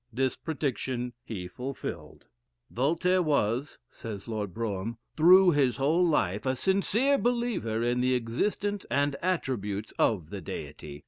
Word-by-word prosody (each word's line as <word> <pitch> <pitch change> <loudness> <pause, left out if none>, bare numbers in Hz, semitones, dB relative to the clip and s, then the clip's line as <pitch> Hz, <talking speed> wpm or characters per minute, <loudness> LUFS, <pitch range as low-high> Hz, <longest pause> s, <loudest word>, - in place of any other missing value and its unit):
This 130 +3 0
prediction 130 -5 -3
he 100 -8 -6
fulfilled. 130 +8 -7 0.5
"Voltaire 170 +8 +2
was," 140 -3 0
says 110 -5 -8
Lord 105 -4 -3
Brougham, 110 +2 -3 0.2
"through 180 +3 +7
his 135 -5 +2
whole 155 +6 +3
life, 105 - +1
a 130 - +2
sincere 205 - +2
believer 235 - 0
in 120 +1 +1
the 130 0 +2
existence 200 - -1
and 140 0 +1
attributes 110 - -2
of 90 -8 +1
the 100 -2 -5
Deity. 75 -2 -7
130 Hz, 130 wpm, -28 LUFS, 110-170 Hz, 0.5 s, through